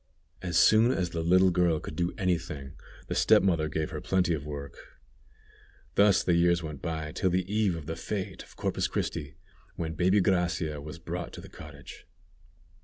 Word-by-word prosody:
As 90 Hz, -2 st, -1 dB
soon 110 Hz, +6 st, +6 dB
as 90 Hz, -9 st, 0 dB
the 85 Hz, -, -2 dB
little 90 Hz, +3 st, +4 dB
girl 85 Hz, -3 st, +2 dB
could 75 Hz, -, -8 dB
do 85 Hz, +2 st, 0 dB
any 90 Hz, -3 st, +1 dB
thing, 75 Hz, -5 st, -8 dB, 0.3 s
the -, -, -4 dB
step -, -, +5 dB
mother 85 Hz, -5 st, +1 dB
gave 80 Hz, 0 st, -2 dB
her -, -, -5 dB
plenty 90 Hz, -2 st, +1 dB
of 75 Hz, -3 st, -3 dB
work. 70 Hz, -1 st, -9 dB, 1.0 s
Thus 100 Hz, -2 st, +4 dB
the 90 Hz, -, +2 dB
years 85 Hz, 0 st, +3 dB
went 75 Hz, -3 st, -6 dB
by 80 Hz, -2 st, -3 dB
till 95 Hz, +4 st, 0 dB
the 90 Hz, 0 st, 0 dB
eve 105 Hz, -3 st, +1 dB
of 80 Hz, -3 st, -7 dB
the 80 Hz, -, -3 dB
fête 95 Hz, +4 st, -4 dB
of -, -, -15 dB
Corpus -, -, -1 dB
Christi, 70 Hz, 0 st, -3 dB, 0.4 s
when 80 Hz, -3 st, -3 dB
baby 90 Hz, +5 st, +3 dB
Gracia 85 Hz, -5 st, 0 dB
was 75 Hz, +3 st, -8 dB
brought 85 Hz, +1 st, -6 dB
to -, -, -8 dB
the -, -, -12 dB
cottage. 75 Hz, -1 st, -12 dB
85 Hz, 185 wpm, -28 LUFS, 80-90 Hz, 1.0 s, soon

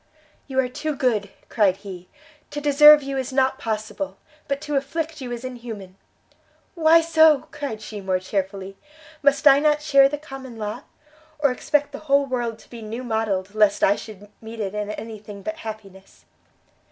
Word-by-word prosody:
"You 265 Hz, -1 st, -1 dB
are 260 Hz, -, +2 dB
too 300 Hz, +4 st, -4 dB
good!" 225 Hz, -7 st, 0 dB, 0.2 s
cried 195 Hz, -4 st, +2 dB
he; 185 Hz, -3 st, -10 dB, 0.4 s
"to 295 Hz, -, -5 dB
deserve 295 Hz, +1 st, +7 dB
you 275 Hz, 0 st, -3 dB
is 260 Hz, -, -4 dB
not 265 Hz, 0 st, +1 dB
possible, 220 Hz, +6 st, -4 dB, 0.3 s
but 280 Hz, 0 st, -1 dB
to 295 Hz, -1 st, -3 dB
afflict 310 Hz, +2 st, -3 dB
you 250 Hz, -2 st, -6 dB
is 240 Hz, +1 st, -5 dB
inhuman!" 230 Hz, -7 st, -8 dB, 0.8 s
"Why 330 Hz, -1 st, +5 dB
so?" 320 Hz, -3 st, +4 dB
cried 265 Hz, -7 st, -5 dB
she, 210 Hz, -1 st, -7 dB
more 190 Hz, -1 st, 0 dB
chearfully; 195 Hz, +1 st, -4 dB, 0.4 s
"must 280 Hz, 0 st, +2 dB
I 275 Hz, 0 st, +8 dB
not 300 Hz, 0 st, +2 dB
share 275 Hz, -2 st, +5 dB
the 295 Hz, -, -3 dB
common 270 Hz, -5 st, -10 dB
lot? 215 Hz, +4 st, -5 dB, 0.5 s
or 290 Hz, -3 st, +2 dB
expect 290 Hz, +3 st, 0 dB
the 280 Hz, -, -7 dB
whole 280 Hz, 0 st, +4 dB
world 240 Hz, -4 st, -3 dB
to -, -, -20 dB
be 235 Hz, -2 st, -9 dB
new 225 Hz, +3 st, -6 dB
modelled, 210 Hz, -5 st, -2 dB
lest 210 Hz, -1 st, +3 dB
I 200 Hz, -, +5 dB
should 205 Hz, -2 st, -10 dB
meet 225 Hz, 0 st, -9 dB
in 200 Hz, -2 st, -3 dB
it 210 Hz, 0 st, -3 dB
any 225 Hz, -1 st, -7 dB
thing 205 Hz, -1 st, -11 dB
but 320 Hz, 0 st, -4 dB
happiness?" 205 Hz, -7 st, -10 dB
245 Hz, 175 wpm, -23 LUFS, 210-285 Hz, 0.8 s, I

